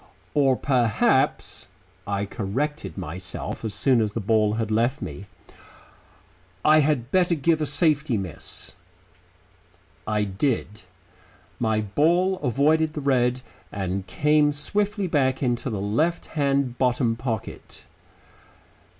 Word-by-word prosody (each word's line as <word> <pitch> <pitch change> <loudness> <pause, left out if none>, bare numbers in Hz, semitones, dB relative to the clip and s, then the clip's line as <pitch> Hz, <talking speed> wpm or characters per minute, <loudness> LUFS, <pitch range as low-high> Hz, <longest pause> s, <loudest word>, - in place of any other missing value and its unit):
"Or 135 -3 +3
perhaps," 120 -5 +1 0.4
I 100 0 -1
corrected 125 +10 -3
myself, 90 +3 -5
as 110 -2 -3
soon 130 -4 +3
as 105 -2 -1
the 115 - -2
ball 105 0 +2
had 110 -1 -2
left 120 +6 +1
me, 80 +7 -7 1.4
"I 155 +1 +6
had 140 -5 0
better 180 -2 +3
give 160 +1 +1
a 150 - 0
safety 145 -3 +1
miss." 90 -6 -6 1.3
I 105 -1 +1
did. 105 +1 -2 0.8
My 110 -2 +1
ball 170 - +2
avoided 150 +4 +2
the 150 - -4
red 125 -2 +1 0.3
and 95 -1 -3
came 150 +7 +3
swiftly 205 +7 -1
back 135 -5 +1
into 120 +1 0
the 105 -4 -3
left 135 - 0
hand 140 -4 0
bottom 125 -2 +2
pocket. 115 -3 -6
125 Hz, 115 wpm, -24 LUFS, 110-150 Hz, 1.4 s, I